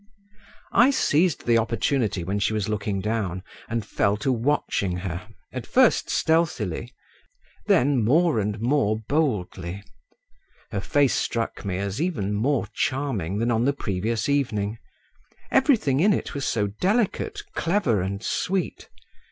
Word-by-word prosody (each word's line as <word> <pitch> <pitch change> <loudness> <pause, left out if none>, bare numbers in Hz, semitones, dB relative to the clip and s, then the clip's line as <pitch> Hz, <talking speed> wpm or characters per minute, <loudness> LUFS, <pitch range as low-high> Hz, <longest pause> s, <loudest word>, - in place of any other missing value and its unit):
I 250 +3 +6
seized 175 - +2
the 115 -1 +4
opportunity 115 -3 0
when 95 +4 -2
she 100 - +1
was 105 -3 -1
looking 105 -2 -2
down 95 -4 -2 0.3
and 115 -2 -2
fell 100 -1 +1
to 135 - +3
watching 115 -7 0
her, 90 +2 -5 0.3
at 130 -2 -5
first 255 -2 +3
stealthily, 130 - 0 0.8
then 145 - +3
more 155 +2 +3
and 105 +1 -2
more 115 -3 +1
boldly. 100 - -2 0.9
Her 100 -3 -2
face 140 +4 +2
struck 115 -1 -2
me 95 -2 -2
as 100 +6 -3
even 125 - -1
more 130 +6 +1
charming 115 - -1
than 115 +2 +1
on 115 +1 +2
the 140 - +2
previous 110 -2 -2
evening; 115 -7 0 0.7
everything 225 - +3
in 200 +5 +5
it - - -3
was 140 -1 -3
so 105 -3 +1
delicate, 190 - 0
clever, 165 - +1
and 100 +3 -3
sweet. 185 +6 -2
115 Hz, 135 wpm, -24 LUFS, 100-145 Hz, 0.9 s, I